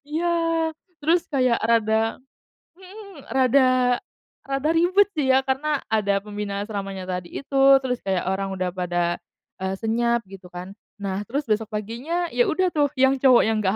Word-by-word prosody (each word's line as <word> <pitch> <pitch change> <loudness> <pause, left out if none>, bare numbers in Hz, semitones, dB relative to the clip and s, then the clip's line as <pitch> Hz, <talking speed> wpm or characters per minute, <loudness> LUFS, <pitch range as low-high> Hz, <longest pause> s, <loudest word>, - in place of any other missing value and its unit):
Iya, 340 +3 -1 0.7
terus 335 +3 +2
kayak 255 -5 +1
rada 225 0 +1 0.6
hmm, 390 +2 -13 0.2
rada 260 0 +4 0.8
rada 275 +2 -1
ribet 365 +5 +4
sih 285 -4 0
ya 260 - +5
karena 285 +2 0
ada 200 -2 +1
pembina 205 -1 -5
asramanya 195 -3 -5
tadi 180 -1 -4
itu, 275 -1 0 0.2
terus 250 -2 -3
kayak 190 -2 -1
orang 195 0 -1
udah 185 -1 -2
pada, 175 -1 -1 0.5
eee, 190 0 -1
senyap 235 0 0
gitu 185 -2 -13
kan. 180 +2 -8 0.2
Nah, 200 0 -3
terus 280 +4 -2
besok 215 0 -1
paginya 240 - -3
ya 245 - +3
udah 370 +3 +1
tuh 290 -2 +2
yang 265 +1 +5
cowok 255 -3 +6
yang 220 0 +1
nggak 190 +2 +1
230 Hz, 155 wpm, -23 LUFS, 195-280 Hz, 0.8 s, cowok